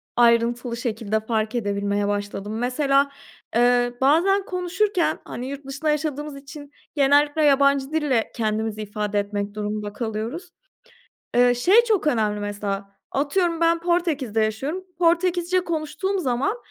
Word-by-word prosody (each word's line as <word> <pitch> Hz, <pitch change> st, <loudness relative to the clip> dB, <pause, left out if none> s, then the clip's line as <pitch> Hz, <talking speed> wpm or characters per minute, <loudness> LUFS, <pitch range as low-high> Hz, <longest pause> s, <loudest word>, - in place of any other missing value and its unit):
ayrıntılı 235 Hz, 0 st, +2 dB
şekilde 220 Hz, -3 st, -2 dB
fark 220 Hz, 0 st, -2 dB
edebilmeye 205 Hz, -2 st, -1 dB
başladım, 205 Hz, +1 st, -3 dB
mesela, 275 Hz, +3 st, +2 dB, 0.4 s
eee, 245 Hz, 0 st, +3 dB
bazen 360 Hz, +8 st, +3 dB
konuşurken, 370 Hz, 0 st, 0 dB
hani, 250 Hz, -, -6 dB
yurt 280 Hz, +1 st, -7 dB
dışında 275 Hz, +3 st, -3 dB
yaşadığımız 300 Hz, -1 st, -2 dB
için 285 Hz, +1 st, -11 dB, 0.2 s
genellikle 290 Hz, +2 st, +3 dB
yabancı 280 Hz, -1 st, +3 dB
dille 295 Hz, -7 st, 0 dB
kendimizi 220 Hz, -1 st, -2 dB
ifade 210 Hz, 0 st, -2 dB
etmek 205 Hz, 0 st, -3 dB
durumunda 210 Hz, 0 st, -4 dB
kalıyoruz. 230 Hz, -, -4 dB, 0.9 s
Eee, 245 Hz, 0 st, +5 dB
şey 380 Hz, -, +5 dB
çok 430 Hz, -9 st, +1 dB
önemli, 215 Hz, -6 st, +1 dB
mesela, 200 Hz, -1 st, -4 dB
atıyorum, 335 Hz, +4 st, 0 dB
ben 335 Hz, 0 st, +3 dB
Portekiz'de 330 Hz, -, 0 dB
yaşıyorum, 265 Hz, -, -2 dB
Portekizce 350 Hz, +1 st, +2 dB
konuştuğum 340 Hz, +4 st, -2 dB
zaman 275 Hz, -, 0 dB
265 Hz, 120 wpm, -23 LUFS, 215-320 Hz, 0.9 s, Eee